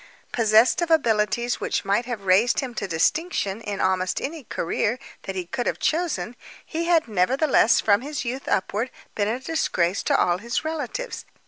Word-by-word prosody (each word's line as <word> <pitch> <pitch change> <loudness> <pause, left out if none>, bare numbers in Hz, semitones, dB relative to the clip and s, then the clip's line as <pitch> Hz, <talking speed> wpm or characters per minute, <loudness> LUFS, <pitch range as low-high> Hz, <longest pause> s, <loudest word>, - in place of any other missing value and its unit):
Possessed 225 +5 +4
of 340 - 0
abilities 235 -5 +2
which - - -1
might 205 +5 +1
have 225 -6 -5
raised 200 +6 +4
him 260 -3 -4
to 205 -3 -3
distinction 200 - 0
in 205 -3 -4
almost 185 0 +1
any 300 -1 -5
career 210 +7 -1 0.3
that 195 - -3
he 185 -2 -3
could 245 +7 -3
have - - 0
chosen, 300 - -1 0.3
he 335 +1 -3
had 335 -4 +3
nevertheless, 230 - +3
from 205 0 +3
his 280 0 -4
youth 255 +3 -4
upward, 210 +6 0 0.2
been 205 -1 0
a 230 +4 -1
disgrace 220 - 0
to - - +2
all 175 0 +2
his 235 +7 -3
relatives. 320 - -4
235 Hz, 175 wpm, -24 LUFS, 200-280 Hz, 0.3 s, Possessed